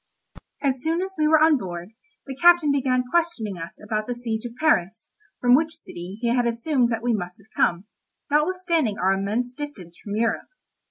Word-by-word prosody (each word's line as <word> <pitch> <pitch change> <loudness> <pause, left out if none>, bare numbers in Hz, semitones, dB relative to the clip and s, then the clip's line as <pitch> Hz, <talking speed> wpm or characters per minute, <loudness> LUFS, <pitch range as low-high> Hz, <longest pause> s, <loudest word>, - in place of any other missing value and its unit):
As 265 -2 0
soon 330 +4 0
as 385 0 -6
we 305 -2 +2
were 315 +1 +6
on 315 -1 +5
board, 175 -2 -6 0.4
the 270 - -6
captain 345 0 +5
began 255 -2 +1
questioning 325 - 0
us 165 +1 -7
about 215 0 -3
the 245 - -2
siege 230 -2 -4
of 235 -1 -7
Paris, 225 - +1 0.3
from 245 0 +4
which 315 +4 +3
city 185 - -9
he 235 - +1
had 245 -1 +2
assumed 240 +2 +1
that 225 0 -2
we 240 -1 +2
must 180 -4 -4
have 200 - -23
come, 175 +3 +1 0.5
notwithstanding 320 - +1
our 190 +1 +2
immense 215 +6 -2
distance 250 - -8
from 205 -1 -4
Europe. 225 0 0
245 Hz, 185 wpm, -24 LUFS, 210-305 Hz, 0.5 s, were